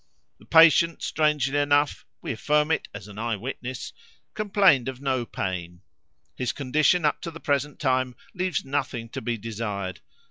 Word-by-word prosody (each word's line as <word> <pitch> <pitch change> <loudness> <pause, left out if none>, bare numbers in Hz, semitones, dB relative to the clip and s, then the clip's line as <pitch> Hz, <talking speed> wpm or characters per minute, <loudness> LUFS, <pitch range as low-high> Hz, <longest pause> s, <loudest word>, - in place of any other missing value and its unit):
The - - -19
patient, 165 0 +6
strangely 150 -3 +1
enough 145 0 +1 0.2
we - - -3
affirm 150 +1 +1
it - - 0
as - - -9
an 105 0 -10
eye 115 0 -1
witness 125 +3 -6 0.4
complained 195 - +3
of 130 -1 -7
no 130 -4 -1
pain. 90 -2 -4 0.5
His 125 -2 -1
condition 155 +5 +2
up 150 - +1
to - - -4
the 165 0 -10
present 145 -1 -1
time 130 -2 +1 0.2
leaves 180 -5 -1
nothing 135 -4 -3
to - - -6
be 120 +1 -2
desired. 105 -4 -4
135 Hz, 155 wpm, -25 LUFS, 115-150 Hz, 0.5 s, patient